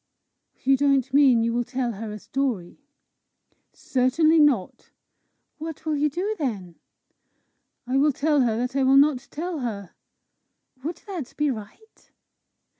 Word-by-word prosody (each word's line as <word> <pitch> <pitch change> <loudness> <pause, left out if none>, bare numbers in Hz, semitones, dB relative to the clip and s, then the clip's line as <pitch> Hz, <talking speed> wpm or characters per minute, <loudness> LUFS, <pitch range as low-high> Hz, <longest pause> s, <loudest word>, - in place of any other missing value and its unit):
"You 270 +1 +4
don't 275 -2 +1
mean 265 -5 +5
you 230 0 0
will 240 +1 0
tell 245 0 -2
her 215 0 -6
a 210 - -6
story?" 225 - -3 0.9
"Certainly 310 +6 +2
not." 275 -11 +1 0.7
"What 320 0 -7
will 310 -1 0
you 295 +1 +1
do 380 +9 -2
then?" 200 - -3 1.1
"I 255 +2 0
will 295 +2 +4
tell 290 +1 +1
her 230 -3 +1
that 250 +2 -3
I 275 - +2
will 265 +1 +5
not 275 -2 +3
tell 335 +1 -4
her." 210 -7 -5 0.9
"Would 325 +3 -5
that 345 - -7
be 295 -1 +1
right?" 240 - -11
270 Hz, 140 wpm, -24 LUFS, 235-300 Hz, 1.1 s, mean